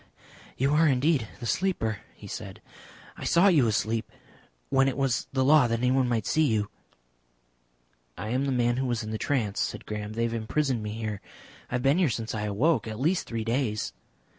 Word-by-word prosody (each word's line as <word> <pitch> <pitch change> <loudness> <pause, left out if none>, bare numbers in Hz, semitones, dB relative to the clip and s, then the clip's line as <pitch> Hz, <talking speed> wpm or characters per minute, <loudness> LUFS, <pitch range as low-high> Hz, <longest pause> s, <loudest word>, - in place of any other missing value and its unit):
"You 135 +3 +2
are 155 +1 +5
indeed 135 -2 +2
the - - -6
Sleeper," 115 - 0 0.2
he - - -13
said. - - -7 0.6
"I - - -8
saw 180 +4 +5
you 145 -10 +4
asleep. 110 +1 -1 0.6
When 135 0 +4
it 135 - -1
was 135 -4 0
the 130 -1 +1
law 145 -2 +6
that 115 0 0
anyone 125 +1 +2
might 115 -2 0
see 155 - +2
you." 105 -4 0 1.5
"I 110 - -5
am 130 +4 0
the 140 - 0
man 120 -1 +1
who 130 0 0
was 120 -1 -1
in 110 - -5
the 110 - -3
trance," 115 -8 -1
said - - -2
Graham. 105 0 -5
"They 115 +1 -1
have 115 0 -1
imprisoned 120 +2 -1
me 105 0 -4
here. 110 -3 -4 0.5
I - - -2
have 125 - -1
been 140 +6 +3
here 175 -6 +3
since 115 -1 -3
I 105 -1 -2
awoke 115 +4 +1
at 110 0 -5
least 165 +7 +1
three 115 -1 -3
days." 115 - -1
120 Hz, 200 wpm, -27 LUFS, 110-135 Hz, 1.5 s, law